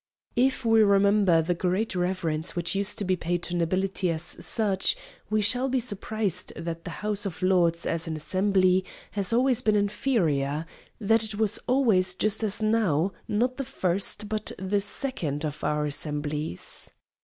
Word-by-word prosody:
If 255 0 +1
we 225 -1 +5
remember 200 -4 +4
the 175 +2 0
great 185 +6 -1
reverence 175 -3 -2
which 170 -1 -1
used 200 +2 0
to 205 - -2
be 185 0 +2
paid 175 0 -2
to 175 - -2
nobility 185 +2 0
as 165 -1 -2 0.2
such, 200 -4 +2 0.3
we 215 0 +1
shall 250 +5 +2
be 260 0 +1
surprised 215 -3 -1
that 165 +1 -6
the - - -4 0.2
House 205 -1 0
of 185 0 -7
Lords 175 -3 +2
as 165 0 -1
an 160 - -3
assembly, 185 +3 +2 0.3
has 200 -1 0
always 250 +1 +3
been 215 -1 +2
inferior; 165 - 0 0.3
that 225 +1 +3
it 215 -1 0
was 215 0 +1
always 215 -9 +3
just 215 +3 0
as 215 0 -1
now, 200 -6 +2 0.2
not 245 +4 0
the 275 - -2
first, 205 -4 -1
but 215 0 -2
the 190 +2 -1
second 180 - -3
of 150 -1 -5
our 150 0 0
assemblies. 150 - -4
195 Hz, 165 wpm, -26 LUFS, 170-215 Hz, 0.3 s, we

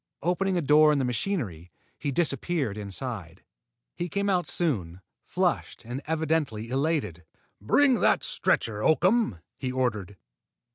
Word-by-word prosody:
Opening 180 +2 +1
a 170 - 0
door 150 +2 +6
in 150 - +2
the 135 - +1
machinery, 115 - -3 0.3
he 145 - -2
disappeared 140 - 0
inside. 100 -3 -6 0.5
He 175 - -3
came 200 +3 0
out 180 -2 +1
soon, 95 - -1 0.2
flushed - - -2
and 125 +4 -5
evidently 155 -8 -1
elated. 135 - -1 0.4
"Bring 255 - +4
the - - +4
stretcher, 105 -2 0
Oakham," 170 - +2 0.2
he 130 -2 -2
ordered. 105 -7 -2
135 Hz, 130 wpm, -27 LUFS, 105-170 Hz, 0.5 s, door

